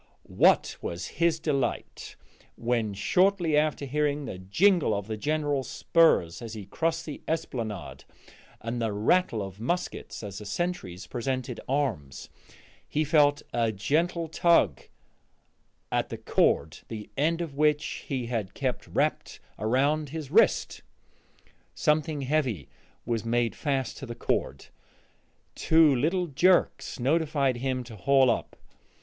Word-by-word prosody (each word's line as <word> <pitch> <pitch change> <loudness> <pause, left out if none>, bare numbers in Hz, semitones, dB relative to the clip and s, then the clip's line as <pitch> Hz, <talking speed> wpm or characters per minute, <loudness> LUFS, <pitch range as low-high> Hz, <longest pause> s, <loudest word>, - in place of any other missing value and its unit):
What - - +3
was 85 +1 -4
his 170 -1 +3
delight 140 -5 -2 0.4
when, 115 -3 -1
shortly 180 - +2
after 150 -1 +1
hearing 145 +1 -1
the 95 - -6
jingle 160 - +3
of 100 -1 -3
the 110 +1 -4
General's 145 +2 -1
spurs 160 - +3
as 115 -1 -7
he 105 -3 -7
crossed 165 - -1
the 150 - -7
esplanade, 115 - -4 0.6
and 115 +1 -3
the 110 -2 -1
rattle 110 - +2
of 95 0 -9
muskets 175 +1 -3
as 100 -1 -6
the 105 - -9
sentries 100 - -3
presented 130 +5 -3
arms, 130 - -2 0.6
he 155 - +1
felt 145 -1 +3
a 115 -2 +1
gentle 165 - 0
tug 170 +2 +3 1.1
at - - 0
the - - -5
cord, - - +1
the 105 -2 -7
end 160 +4 +1
of 165 -5 -4
which 150 0 0
he 130 -4 -2
had 115 -5 -3
kept - - -2
wrapped - - -1 0.2
around 140 +7 +1
his 150 -2 -6
wrist! 225 +7 +3 0.9
Something 150 -1 +1
heavy 130 - -1 0.4
was 115 -2 -1
made 120 0 0
fast 135 -5 -2
to 135 - -7
the 120 - -6
cord; - - -2 0.9
two 160 -3 +4
little 170 +8 +1
jerks 175 0 +2
notified 140 -1 +1
him 130 0 -2
to 115 -2 -11
haul 135 +3 +4
up. - - -3
135 Hz, 130 wpm, -27 LUFS, 115-155 Hz, 1.1 s, two